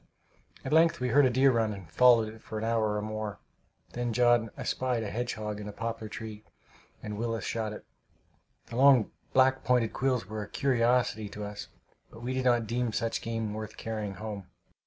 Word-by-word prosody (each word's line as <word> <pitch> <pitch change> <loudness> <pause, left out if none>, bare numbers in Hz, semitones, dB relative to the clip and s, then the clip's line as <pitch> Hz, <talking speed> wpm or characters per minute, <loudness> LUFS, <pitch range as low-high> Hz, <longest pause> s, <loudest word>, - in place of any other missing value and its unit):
At - - -2
length 165 +1 +5
we 125 0 -1
heard 140 +2 +5
a - - +2
deer 130 +2 +4
run, 115 -3 +1
and 95 -4 -10
followed 110 +5 +4
it 110 - -15
for 110 - -7
an 110 - -3
hour 110 -2 +1
or 105 - -2
more. 110 -1 -4 0.6
Then 120 -1 -2
John 120 -1 +3
espied 125 -3 -1
a 100 - -4
hedgehog 110 -3 -3
in 105 - -7
a - - -5
poplar 115 0 -5
tree, 110 -1 -7 0.6
and 105 -1 -5
Willis 115 -1 -2
shot 110 -2 -2
it. 105 - -9 0.8
The 115 - -7
long 130 -4 +6 0.2
black 130 0 +4
pointed 125 -3 +2
quills 130 -5 0
were 110 +2 -5
a 105 - -7
curiosity 120 -4 +1
to 105 +1 -7
us, 105 0 -7 0.4
but 115 - -13
we 125 +2 -2
did 130 0 -1
not 120 -2 +3
deem 120 +1 -1
such 115 +1 -1
game 115 -2 -3
worth 110 0 -6
carrying 105 -3 -4
home. 105 -2 -6
115 Hz, 195 wpm, -29 LUFS, 105-125 Hz, 0.8 s, long